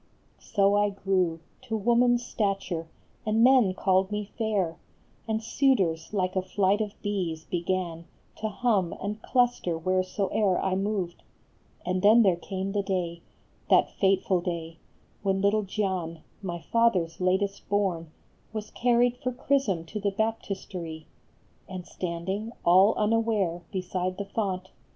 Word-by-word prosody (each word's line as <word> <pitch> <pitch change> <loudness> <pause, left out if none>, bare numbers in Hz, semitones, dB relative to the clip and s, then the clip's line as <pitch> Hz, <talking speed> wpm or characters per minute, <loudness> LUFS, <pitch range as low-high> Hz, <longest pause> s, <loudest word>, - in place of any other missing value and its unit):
So 200 -2 +2
I 205 0 +3
grew 185 -4 0 0.2
To 225 -3 -2
woman 240 +3 +4
s 240 - -2
stature, 195 -7 -2 0.4
and 220 +1 +2
men 245 -7 +5
called 190 -1 +2
me 210 0 -3
fair, 200 -8 0 0.5
And 220 0 -1
suitors, 195 - +1
like 185 -3 -1
a 185 - +2
flight 195 +2 +1
of 210 -1 -4
bees, 175 -6 -2
began 175 -1 -2 0.3
To 220 - -2
hum 210 -5 +1
and 210 +2 -4
cluster 245 -9 +1
wheresoe 185 +3 0
er 195 -4 +3
I 190 - 0
moved; 195 -2 -2 0.6
And 185 0 0
then 220 +4 +7
there 190 -4 +4
came 190 +2 -4
the 205 0 +1
day, 175 -3 -2 0.5
that - - +5
fateful 190 -2 +2
day, 165 -2 -4 0.4
When 195 -1 +1
little 200 +2 +3
Gian, 185 -5 -3 0.2
my 175 -3 -4
father 230 -2 +2
s 165 +2 -15
latest 195 +2 0
born, 190 -5 0 0.4
Was 215 -1 -5
carried 245 0 +2
for 255 0 -2
chrism 245 -9 0
to 210 +6 -5
the 200 0 +1
baptistery; 195 -6 -4 0.6
And 185 -2 -6
standing, 190 +7 -4
all 190 +5 +6
unaware, 210 -5 +1
beside 185 -1 -2
the 200 - -3
font, - - -24
A - - -31
FLORENTINE 190 -4 -1
JULIET. 185 - -24
195 Hz, 150 wpm, -27 LUFS, 180-215 Hz, 0.6 s, then